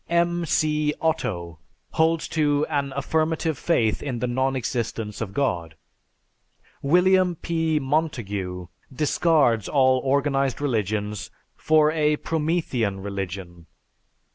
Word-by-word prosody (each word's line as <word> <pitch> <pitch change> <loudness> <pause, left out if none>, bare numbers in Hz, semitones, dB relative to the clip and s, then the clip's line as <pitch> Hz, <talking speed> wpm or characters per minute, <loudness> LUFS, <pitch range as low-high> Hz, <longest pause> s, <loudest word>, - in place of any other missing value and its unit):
M. 170 0 +1
C. 150 -1 +1
Otto 85 - -2 0.3
holds 160 0 +1
to 145 -2 +1
"An 140 -2 -1
affirmative 160 +3 0
faith 120 -8 +1
in 130 -4 -3
the 125 - -2
non 130 +2 0
existence 115 -4 -3
of 105 -4 -3
God." 90 - -1 1.1
William 180 +4 +3
P. 160 -1 -1
Montague 115 - -2 0.3
discards 145 - +2
all 130 -2 +4
organized 135 -1 +1
religions 105 -6 -2 0.3
for 155 -1 +3
a 150 -1 +2
"Promethean 150 - -1
Religion." 95 -3 -6
140 Hz, 105 wpm, -24 LUFS, 110-160 Hz, 1.1 s, all